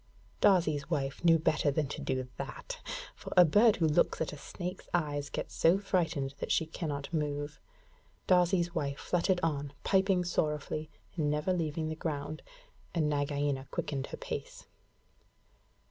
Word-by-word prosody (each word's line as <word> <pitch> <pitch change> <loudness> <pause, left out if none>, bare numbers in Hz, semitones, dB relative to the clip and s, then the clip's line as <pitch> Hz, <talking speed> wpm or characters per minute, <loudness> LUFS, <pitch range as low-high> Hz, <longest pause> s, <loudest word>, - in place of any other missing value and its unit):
Darzee's 155 -7 +3
wife 140 -3 -2
knew 165 -1 +7
better 155 -2 +2
than 150 +2 +1
to - - -5
do 130 -1 -1
that, - - -6 0.3
for - - -9
a 180 - +10
bird 210 +7 +5
who 165 - +1
looks 150 - +2
at 160 - -2
a - - -5
snake's 180 +5 -6
eyes 145 -4 -1
gets - - -4
so 170 +3 +4
frightened 170 -8 0
that - - -3
she 160 - +3
cannot 155 -2 -4
move. 145 -1 -2 0.7
Darzee's 175 -1 +3
wife 140 -4 -1
fluttered 180 +1 +1
on, 145 -3 -1
piping 190 -2 +3
sorrowfully, 155 -2 -1 0.3
and 155 -4 +1
never 150 +5 +1
leaving 160 -2 -1
the 160 - -3
ground, 155 -1 -4 0.5
and 155 -3 +2
Nagaina 145 -2 0
quickened 140 -2 -3
her - - -7
pace. - - -6
155 Hz, 150 wpm, -31 LUFS, 145-175 Hz, 0.7 s, a